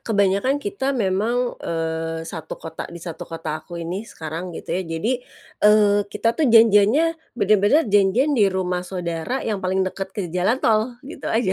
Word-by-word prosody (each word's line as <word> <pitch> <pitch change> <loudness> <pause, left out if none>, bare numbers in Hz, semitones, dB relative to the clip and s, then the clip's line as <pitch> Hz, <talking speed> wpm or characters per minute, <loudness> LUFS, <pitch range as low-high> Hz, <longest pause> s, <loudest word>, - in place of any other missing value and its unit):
kebanyakan 200 +5 +1
kita 285 -6 -2
memang, 225 +4 0
eee, 165 0 -3
1 160 -1 -7
kota 160 0 -7
di 170 - -9
satu 165 -1 -7
kota 155 -2 -4
aku 175 +1 -10
ini, 170 +3 -4
sekarang, 165 +3 -6
gitu - - -6
ya. 185 - 0 0.2
Jadi, 225 +10 0 0.5
eee, 210 -1 +5
kita 230 +3 0
tuh 300 -2 +1
janjiannya 225 +5 +6 0.3
bener-bener 210 +8 +4
janjian 205 +9 +3
di 210 -7 +4
rumah 180 -1 -1
saudara 180 +6 -4
yang 210 -4 -2
paling 190 +1 0
dekat 190 +1 -4
ke 200 - -1
jalan 185 +7 +2
tol, 225 0 +1
gitu 295 - -7
aja. 225 -4 +1
200 Hz, 165 wpm, -22 LUFS, 175-230 Hz, 0.5 s, janjiannya